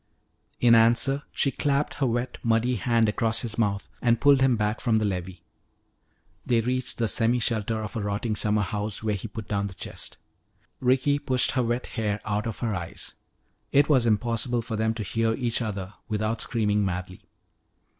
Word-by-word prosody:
In 120 -1 +5
answer 120 +5 +4
she 140 - +1
clapped 140 +1 0
her 135 - 0
wet, 120 +1 -2
muddy 115 +2 +2
hand 115 +2 +2
across 110 +1 +1
his 115 -1 -4
mouth 100 -3 0
and 120 -1 +3
pulled 140 -2 +5
him 130 -2 +4
back 105 +1 -1
from 115 -2 +2
the 110 - +1
levee. 90 -2 -4 1.0
They 120 -3 +2
reached 125 +2 -2
the 115 - +1
semi 115 +2 +2
shelter 110 -2 0
of 105 - -7
a 110 - -2
rotting 105 +2 -2
summer 105 0 +1
house 105 +2 -3
where 110 -1 0
he 100 +2 -4
put 105 0 -8
down 100 -1 -1
the 95 - -10
chest. - - -6 0.6
Ricky 130 +3 +2
pushed 130 -3 +2
her 130 - +1
wet 120 +1 -1
hair 105 -3 -2
out 105 +1 -1
of 115 - -4
her 110 - 0
eyes. 85 -3 -6 0.6
It 140 +2 +4
was 130 -5 +4
impossible 115 +2 +1
for 115 0 -4
them 110 +1 0
to 110 - -3
hear 115 +3 0
each 120 -1 0
other 100 -3 -4
without 110 +1 -1
screaming 105 -3 +1
madly. 90 -1 -4
115 Hz, 185 wpm, -26 LUFS, 105-120 Hz, 1.0 s, In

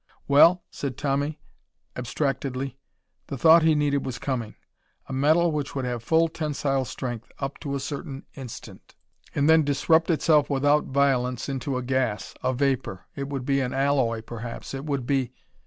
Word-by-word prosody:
"Well?" 170 +5 +6
said 135 -3 -5
Tommy 145 +2 -1 0.6
abstractedly. 135 0 -3 0.5
The 140 - -5
thought 160 +6 +7
he 160 -1 +4
needed 145 -1 +1
was 130 -2 -4
coming. 120 -6 -3 0.5
A - - -7
metal 155 +5 +3
which 150 -3 -3
would 135 -2 -2
have 120 -2 -3
full 165 +7 +3
tensile 145 -4 -1
strength 120 -2 -6
up 135 0 -5
to 140 -1 -3
a - - -2
certain 135 0 -6
instant, 130 -5 -10 0.4
and 145 0 +2
then 160 0 +6
disrupt 160 +4 +2
itself 155 -2 +3
without 145 +2 +3
violence 130 -3 +1
into 135 -1 -2
a 130 - -3
gas, 125 -4 -1
a - - +2
vapor.... 130 -8 -1
It 140 -1 -4
would 135 -3 -4
be 140 0 +2
an 130 0 -2
alloy, 135 -5 +1
perhaps. 115 +2 -7
It 135 +1 -5
would 140 -4 -2
be.... 130 -2 0
135 Hz, 165 wpm, -25 LUFS, 130-145 Hz, 0.6 s, thought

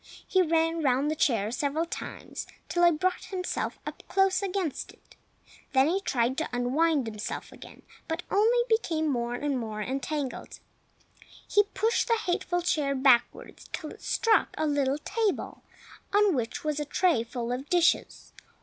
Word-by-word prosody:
He 375 - +3
ran 325 -1 +1
round 275 +1 +2
the - - -1
chair 225 -8 +1
several 290 +5 -1
times, 335 - -7 0.2
till 350 - +1
he 345 - +8
brought 365 +3 -1
himself 370 -3 -3
up - - -7
close 385 -1 +2
against 380 -6 -2
it; - - -23 0.6
then 265 +1 +5
he 375 +5 +1
tried 255 - 0
to 320 - -2
unwind 270 +4 +1
himself 215 -2 -5
again, - - -13 0.2
but 330 +1 -3
only 445 +4 +4
became 345 -9 +1
more 240 -3 -1
and 280 0 -1
more 220 -2 -5
entangled. 270 +4 -4 0.9
He 415 0 +4
pushed 445 +4 +1
the 460 - +3
hateful 355 -3 -1
chair 295 -6 +1
backwards 260 -3 +2
till 305 - -5
it - - -13
struck 455 -1 +2
a 315 - 0
little 285 -2 +1
table 415 +6 -2 0.5
on 410 -1 +4
which 240 -5 -3
was 300 -1 -1
a 295 - -2
tray 315 -5 +2
full 235 0 -4
of 260 +3 -4
dishes. 350 -1 +1
310 Hz, 160 wpm, -28 LUFS, 260-365 Hz, 0.9 s, he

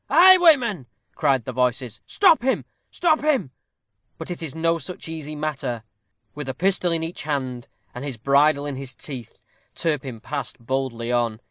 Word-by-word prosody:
a - - -1
highwayman!" 315 - +6 0.3
cry 135 - +2
the 130 0 -7
voices: 125 -2 -1
"stop 365 -8 +5
him, 260 +2 0 0.2
stop 320 -3 +2
him!" 285 - +1 0.7
But - - -6
it 175 - -5
is 160 -3 -4
no 165 +1 +1
such 170 +4 -8
easy 155 -2 -5
matter. 145 -7 -3 0.5
With 145 -2 -6
a 130 - -3
pistol 185 -1 +2
in 165 -1 0
each 165 +2 -4
hand, 130 -5 -3 0.3
and 125 - -7
his 140 -4 -4
bridle 140 +4 +3
in 145 -2 -3
his 135 -2 -6
teeth, 130 -6 -7 0.4
Turpin 135 -7 -2
passed 140 +5 -4
boldly 120 -1 -3
on. 120 -3 0
145 Hz, 165 wpm, -23 LUFS, 130-170 Hz, 0.7 s, highwayman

